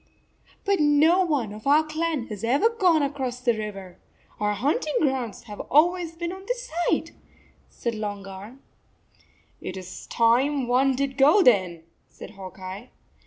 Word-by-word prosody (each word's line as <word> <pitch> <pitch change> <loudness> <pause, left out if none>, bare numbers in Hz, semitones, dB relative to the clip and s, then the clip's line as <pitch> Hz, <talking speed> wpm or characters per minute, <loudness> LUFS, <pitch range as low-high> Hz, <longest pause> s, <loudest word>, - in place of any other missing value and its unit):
" - - -32
But 400 -1 +2
no 305 +5 +4
one 275 - -1
of 215 +4 -9
our 295 +3 +5
clan 310 -3 -2
has 210 -1 -7
ever 275 - +3
gone 365 -9 +2
across 265 -3 -3
the 245 -1 +2
river. 195 -4 -7 0.4
Our 210 0 +1
hunting 290 +7 -1
grounds 265 -8 -1
have 210 -3 -10
always 335 +3 +3
been 340 +1 -4
on 380 +1 -9
this - - -4 0.2
side," - - 0 0.6
said 235 - -4
Long 205 -2 -5
Arm. 200 +7 -11 1.0
"It 185 - -6
s 185 0 -9
time 255 +5 +2
some 245 - -4
one 260 +2 +3
did 270 0 -2
go, 305 +9 +6
then," 185 - +3 0.2
said - - -12
Hawk 190 -3 -10
Eye. 190 +6 -8
260 Hz, 165 wpm, -25 LUFS, 210-310 Hz, 1.0 s, go